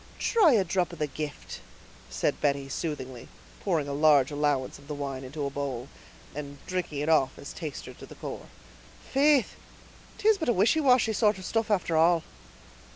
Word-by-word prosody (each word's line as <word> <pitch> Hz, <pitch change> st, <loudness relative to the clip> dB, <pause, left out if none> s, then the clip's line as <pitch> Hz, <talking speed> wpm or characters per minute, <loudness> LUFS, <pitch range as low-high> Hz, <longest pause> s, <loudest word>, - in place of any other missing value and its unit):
"Try 405 Hz, -, +4 dB
a 210 Hz, -4 st, +4 dB
drop 180 Hz, 0 st, 0 dB
of -, -, -8 dB
the 150 Hz, -, 0 dB
gift," 150 Hz, 0 st, -6 dB, 0.5 s
said -, -, -1 dB
Betty, 140 Hz, -1 st, 0 dB
soothingly, 130 Hz, -5 st, -5 dB, 0.3 s
pouring 165 Hz, -7 st, 0 dB
a 140 Hz, -, -3 dB
large 145 Hz, -2 st, +4 dB
allowance 145 Hz, -3 st, -1 dB
of 140 Hz, -, -17 dB
the 150 Hz, -, -4 dB
wine 135 Hz, -2 st, -4 dB
into 140 Hz, +3 st, -5 dB
a 140 Hz, -, -3 dB
bowl, 135 Hz, -3 st, -4 dB, 0.4 s
and 145 Hz, -1 st, -7 dB
drinking 175 Hz, -6 st, -3 dB
it 150 Hz, -, -2 dB
off 145 Hz, -5 st, +3 dB
as 140 Hz, -, -9 dB
taster 155 Hz, -5 st, -7 dB
to -, -, -12 dB
the -, -, -12 dB
corps. -, -, -7 dB, 0.6 s
"Faith, 280 Hz, -2 st, +4 dB, 0.6 s
'tis 430 Hz, -1 st, +3 dB
but 320 Hz, -, -1 dB
a -, -, +4 dB
wishy 215 Hz, -, +3 dB
washy 250 Hz, -6 st, +4 dB
sort 210 Hz, -2 st, +2 dB
of 185 Hz, -, -9 dB
stuff 225 Hz, -1 st, -1 dB
after 180 Hz, -5 st, +1 dB
all!" 165 Hz, +1 st, +4 dB
155 Hz, 180 wpm, -28 LUFS, 140-205 Hz, 0.6 s, Try